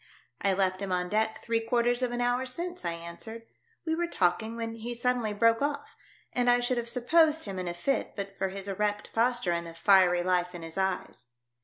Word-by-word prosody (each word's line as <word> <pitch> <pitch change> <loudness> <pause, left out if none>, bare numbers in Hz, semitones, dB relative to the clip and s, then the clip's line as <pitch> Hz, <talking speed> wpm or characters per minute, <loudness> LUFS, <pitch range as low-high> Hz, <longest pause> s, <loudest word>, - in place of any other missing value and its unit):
" - - -38
I 195 - +2
left 185 0 0
him 195 -1 -3
on 180 0 0
deck 220 +1 0
three 230 -1 +1
quarters 240 +2 +1
of 250 -1 0
an 240 0 -2
hour 245 +1 +1
since," 350 +7 -3
I 170 - -1
answered. 170 +7 -9 0.4
"We 320 - 0
were 345 +1 0
talking 220 - 0
when 230 -1 -4
he 240 +2 -5
suddenly 240 -2 0
broke 230 +3 +3
off, 285 0 -2 0.4
and 245 0 +2
I 245 0 +5
should 245 +1 0
have 235 0 -2
supposed 310 +6 +3
him 195 -3 -5
in 180 - -4
a 175 - -3
fit 275 +10 -1
but 195 -1 -5
for 195 -1 -1
his 195 +1 -6
erect 205 +1 -2
posture 240 -4 +2
and 170 0 -2
the 165 - -10
fiery 180 -1 +5
life 180 0 0
in 170 - -7
his 165 0 -8
eyes." 190 -9 -2
220 Hz, 220 wpm, -29 LUFS, 185-245 Hz, 0.4 s, I